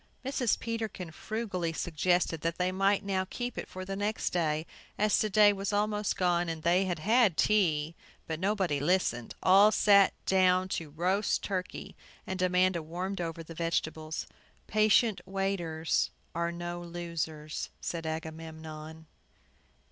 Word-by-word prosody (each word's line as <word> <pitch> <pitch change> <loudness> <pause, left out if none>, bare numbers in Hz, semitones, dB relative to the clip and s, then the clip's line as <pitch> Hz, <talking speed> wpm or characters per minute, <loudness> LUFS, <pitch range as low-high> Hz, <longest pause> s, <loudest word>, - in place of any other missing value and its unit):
Mrs. 260 -4 +1
Peterkin 220 -7 -4
frugally 185 -4 -3
suggested 175 0 0
that 165 0 -1
they 180 0 +1
might 195 +2 +2
now 190 -1 0
keep 245 -1 -4
it - - -5
for 185 0 -7
the 195 +1 -4
next 205 +2 -1
day, 155 -2 0 0.3
as 210 0 +3
to 215 - +1
day 205 0 +6
was 195 0 -3
almost 210 0 0
gone, 175 -1 +1
and 160 -1 -5
they 180 +3 +3
had 175 -2 -1
had 210 0 +3
tea. 165 -7 +2 0.3
But 160 -1 -4
nobody 190 -6 0
listened. 145 -7 0
All 195 +3 +7
sat 200 -2 +5
down 185 -1 +3
to 165 - -2
the - - -14
roast 180 +7 0
turkey; 185 -2 -4 0.3
and 190 -1 -4
Amanda 180 -1 +2
warmed 180 +4 -4
over 165 -1 -4
the 165 - -10
vegetables. 160 -1 -2 0.4
"Patient 215 0 +3
waiters 180 -5 0 0.2
are 170 +1 -1
no 175 0 -5
losers," 170 -3 -4
said 165 -2 -4
Agamemnon. 160 0 -7
180 Hz, 145 wpm, -30 LUFS, 165-200 Hz, 0.4 s, All